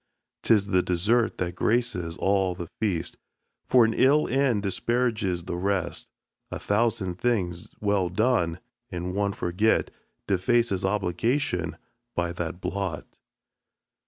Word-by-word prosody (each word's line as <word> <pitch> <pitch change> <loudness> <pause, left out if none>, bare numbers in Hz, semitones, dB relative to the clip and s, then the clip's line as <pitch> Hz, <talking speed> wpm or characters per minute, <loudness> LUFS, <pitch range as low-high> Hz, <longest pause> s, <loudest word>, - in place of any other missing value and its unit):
'Tis 105 -3 +3
the 95 -2 +2
dessert 105 +7 +1
that 90 -1 -2
graces 90 -6 0
all 95 -2 +1
the 85 -1 -5
feast, 100 -7 -1 0.5
For 125 -3 +6
an 110 - +1
ill 145 +4 +4
end 125 -5 +1
disparages 105 -3 0
the 85 - -4
rest. 90 -2 -2 0.4
A - - -4
thousand 105 -4 0
things 90 -8 -1
well 100 -3 +1
done, 90 -4 +1 0.3
and 90 +1 -4
one 100 0 0
forgot, 95 +6 +1 0.3
Defaces 100 0 +1
obligation 95 - 0 0.4
by 85 -1 -1
that 90 0 -4
blot. 95 -6 -3
100 Hz, 120 wpm, -26 LUFS, 90-115 Hz, 0.5 s, For